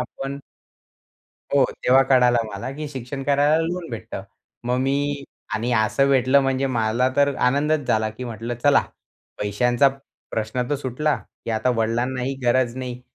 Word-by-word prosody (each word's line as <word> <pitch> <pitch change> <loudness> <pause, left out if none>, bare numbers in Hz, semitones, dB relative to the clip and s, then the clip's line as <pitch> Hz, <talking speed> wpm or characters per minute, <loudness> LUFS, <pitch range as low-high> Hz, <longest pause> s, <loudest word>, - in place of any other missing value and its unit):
आपण. 135 +1 -5 1.2
हो. 140 -2 +5 0.2
तेव्हा 130 +1 +6
कळलं 125 -3 +3
मला 100 +6 -5
की 150 0 -5
शिक्षण 135 0 -6
करायला 145 +2 +3
लोन 175 0 -4
भेटतं. 115 - -6 0.4
मग 125 +1 0
मी 140 +1 -1 0.3
आणि 120 +3 -1
असं 115 +5 +2
भेटलं 135 0 +4
म्हणजे 135 0 0
मला 120 0 +1
तर 145 0 +3
आनंदच 145 +3 +1
झाला 110 0 +2
की 110 +4 -8
म्हटलं 115 0 -5
चला 145 -1 +5 0.6
पैशांचा 120 +6 +2 0.4
प्रश्न 110 +3 -2
तर - - +2
सुटला 140 +3 -1
की - - -10
आता 110 +3 +1
वडिलांनाही 125 +4 -1
गरज 120 0 +2
नाही 125 -1 -5
130 Hz, 145 wpm, -23 LUFS, 120-140 Hz, 1.2 s, तेव्हा